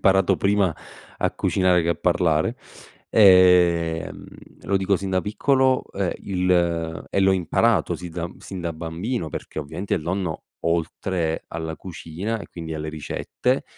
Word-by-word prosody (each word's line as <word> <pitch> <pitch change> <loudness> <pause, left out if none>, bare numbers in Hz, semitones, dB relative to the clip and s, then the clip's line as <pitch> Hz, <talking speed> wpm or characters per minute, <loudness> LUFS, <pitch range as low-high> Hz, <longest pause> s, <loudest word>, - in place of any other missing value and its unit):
imparato 95 0 +4
prima 100 -1 +2 0.4
a - - 0
cucinare 90 -2 +2
che 85 - +1
a - - +1
parlare, 85 -3 +1 0.5
ehm, 90 -5 +4 0.4
lo 100 - +1
dico 95 +1 +2
sin 95 +1 -4
da 95 -1 +2
piccolo, 130 +6 +2
ehm, 95 -2 -1
il 85 -3 0
e 100 - +1
l'ho 95 0 +5
imparato 95 +1 +2
si 90 - -7
zan 85 +1 -5
sin 95 -2 -7
da 85 -1 -3
bambino, 85 +6 -4
perché 80 - -7
ovviamente 80 +7 -3
il 85 - -2
nonno, 90 -1 -3 0.2
oltre 85 0 -1
alla 80 -1 -4
cucina 95 +5 -5
e - - -9
quindi 80 -2 -7
alle 75 0 -4
ricette, 80 - -2
90 Hz, 150 wpm, -23 LUFS, 80-95 Hz, 0.5 s, l'ho